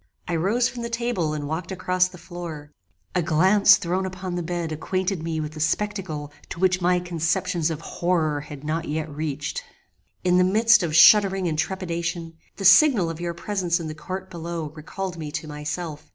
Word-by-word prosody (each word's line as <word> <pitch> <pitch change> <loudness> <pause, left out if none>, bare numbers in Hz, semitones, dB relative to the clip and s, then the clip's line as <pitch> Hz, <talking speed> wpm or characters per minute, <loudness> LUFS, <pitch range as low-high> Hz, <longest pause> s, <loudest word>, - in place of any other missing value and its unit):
I 175 - -1
rose 210 +9 +2
from 240 -1 -7
the 235 - -4
table 230 -9 -1
and 145 -1 -4
walked 165 +4 -4
across 185 0 +1
the 180 0 -13
floor. 165 -5 -8 0.4
A 180 - +2
glance 190 +5 +5
thrown 185 +2 -1
upon 185 -1 -6
the 175 - -2
bed 170 -1 -3
acquainted 185 +3 -2
me 160 -1 -3
with 155 0 -5
a - - -7
spectacle 165 -3 -2 0.2
to - - -7
which 185 0 +2
my 180 +1 +3
conceptions 175 0 -1
of 160 -1 -4
horror 165 -4 0
had 145 -1 -10
not 160 +2 -2
yet 155 -1 -3
reached. 150 -2 -3 0.6
"In 180 0 +3
the - - +5
midst 225 +5 +5
of 160 -3 -1
shuddering 195 +2 +6
and 160 - -1
trepidation, 170 -2 -3 0.2
the 195 - -5
signal 190 - +6
of 165 +1 -8
your 170 -1 -3
presence 180 -1 -1
in 165 - -5
the - - -5
court 185 +5 -7
below 170 -2 -5
recalled 170 +3 -6
me 150 -2 -5
to 160 - -4
myself. 150 +1 -5
175 Hz, 190 wpm, -24 LUFS, 160-190 Hz, 0.6 s, shuddering